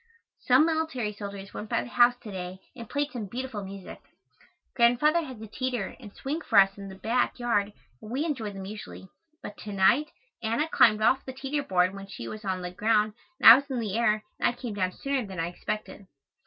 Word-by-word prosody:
Some 260 +4 +5
military 315 -10 -1
soldiers 200 -1 -8
went 210 - -7
by - - 0
the - - -9
house 245 0 +5
to 215 - -8
day 185 -1 -6 0.2
and 235 -4 -9
played 290 0 -1
some 230 -6 -5
beautiful 240 -1 -5
music. 195 0 -9 0.7
Grandfather 255 +7 +4
has 260 -7 -8
a 220 - -7
teter 245 -1 -3
and 215 -5 -11
swing 290 +9 -4
for 225 -8 0
us 195 0 +6
in 200 -1 -8
the 190 - -9
back 235 +5 0
yard 210 -4 0 0.3
and 215 - -10
we 270 +7 -1
enjoy 250 -10 -3
them 195 -1 -7
usually, 205 -2 -9 0.3
but 205 - -8
to 210 - -7
night 220 +10 +3 0.3
Anna 230 +7 0
slid 215 -1 +5
off 260 +4 +3
the 260 - -7
teter 270 +3 -2
board 185 -7 +2
when 195 0 -8
she 150 -12 -8
was 215 - -7
on 185 -2 -2
the 180 - -4
ground 215 +2 +2 0.3
and - - +5
I 225 - +15
was 280 +3 +1
in 260 -2 -2
the 215 -3 -3
air 215 -2 +2 0.2
and - - +3
I - - -3
came 245 -2 -6
down 185 -2 0
sooner 275 +4 -2
than 190 -4 -7
I 165 +1 -1
expected. 200 +2 -6
220 Hz, 220 wpm, -27 LUFS, 200-255 Hz, 0.7 s, I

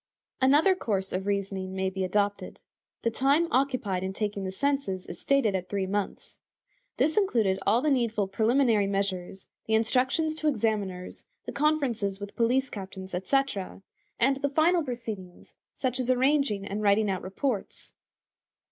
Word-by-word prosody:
Another 295 +8 +5
course 195 - -2
of 190 +2 -2
reasoning 195 -2 -2
may 190 0 -1
be 190 0 -3
adopted. 205 +2 -1 0.4
The 230 - +1
time 280 +8 +2
occupied 255 -8 +1
in 190 0 -3
taking 205 -1 -3
the 190 - -3
census 270 -5 -1
is - - -8
stated 275 -7 +2
at 185 -1 -3
three 200 -2 -1
months. 200 +1 -4 0.6
This 315 - +2
included 225 - +2
all 230 +6 +3
the 305 - +2
needful 230 -6 +1
preliminary 220 +1 +2
measures, 195 -1 -2 0.2
the 220 - +3
instructions 255 +8 +2
to 310 - -1
examiners, 210 -8 -1 0.2
the - - -4
conferences 255 -10 0
with 200 0 -8
police 250 +3 +2
captains, 190 -1 -8
etc; 195 0 -1 0.4
and 270 +3 +3
the 285 +1 -1
final 330 +5 +3
proceedings, 220 -8 -7 0.2
such 255 -1 -1
as 255 -1 0
arranging 255 -5 +2
and 200 +2 -3
writing 210 +1 +3
out 190 -2 -1
reports. 200 +3 -4
215 Hz, 150 wpm, -28 LUFS, 195-270 Hz, 0.6 s, Another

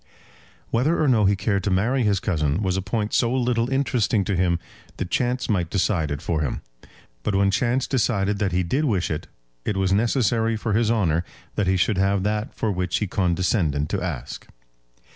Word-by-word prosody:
Whether 135 +9 +2
or 155 - +2
no 115 -6 +4
he 100 +1 +4
cared 100 -1 -1
to 100 - 0
marry 110 +8 +1
his 105 -4 +2
cousin 80 -1 0
was 95 -2 0
a 95 - 0
point 105 +2 -2
so 120 -1 +2
little 120 -2 +1
interesting 120 -6 +1
to 100 - -1
him 90 -1 +2 0.4
that 95 - -4
chance 125 0 0
might 90 -6 0
decide 90 -5 0
it 70 +2 -4
for 80 -3 -1
him; 70 - -2 0.6
but 100 - -1
when 100 0 +3
chance 125 +3 +1
had - - -14
decided 105 -6 +1
that 100 -2 0
he 90 +1 +1
did 135 - 0
wish 100 - 0
it, 75 - -4 0.4
it 105 - -2
was 95 0 +1
necessary 115 +1 +2
for 110 0 -2
his 110 +1 +2
honour 85 -8 +1 0.3
that 105 - -1
he 95 0 +3
should 95 +2 +1
have 95 0 +2
that 105 +5 -1
for 110 - -1
which 90 -2 -1
he 105 - -1
condescended 90 -5 0
to 100 - -1
ask. 85 -9 -5
100 Hz, 200 wpm, -23 LUFS, 90-115 Hz, 0.6 s, no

